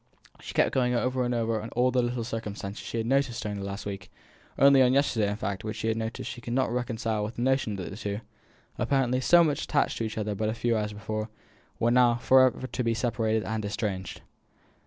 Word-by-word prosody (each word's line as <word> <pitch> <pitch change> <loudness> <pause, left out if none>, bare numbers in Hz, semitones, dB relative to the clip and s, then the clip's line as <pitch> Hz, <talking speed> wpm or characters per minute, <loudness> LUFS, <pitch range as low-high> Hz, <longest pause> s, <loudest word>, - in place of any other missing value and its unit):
She - - -9
kept - - +3
going 125 -2 +2
over 125 +1 0
and 120 0 0
over 115 -2 0
all 125 +1 +2
the 125 0 +2
little 120 0 -2
circumstances 110 -3 -5
she - - -5
had 110 - -1
noticed 135 -1 +1
during 105 -1 -4
the - - -5
last 100 +1 -5
visit, 100 -1 -6 0.5
only 140 -1 +7
on 125 0 +5
yesterday, 120 -7 +2
in 100 - -2
fact, 100 -2 -4
which 110 0 -4
she 115 +3 -3
could 120 - -5
not 130 -2 +1
reconcile 115 -3 -1
with 105 +2 -5
the 120 - -2
notion 130 -5 +1
that 95 -1 -6
the - - -7
two, 105 0 -4 0.6
apparently 130 -2 +1
so 175 +6 +6
much 150 -3 0
attached 145 - 0
to - - -1
each 110 -1 -4
other 105 -1 -1
but 110 +2 -1
a 110 - -2
few 115 0 0
hours 105 -1 -1
before, 110 +1 -4 0.5
were 115 - +2
now 120 -1 +5
to - - -6
be - - -16
for 130 0 +7
ever 125 -2 -2
separated 110 -2 0
and 110 -1 -3
estranged. 100 -3 -3
115 Hz, 220 wpm, -27 LUFS, 105-125 Hz, 0.6 s, only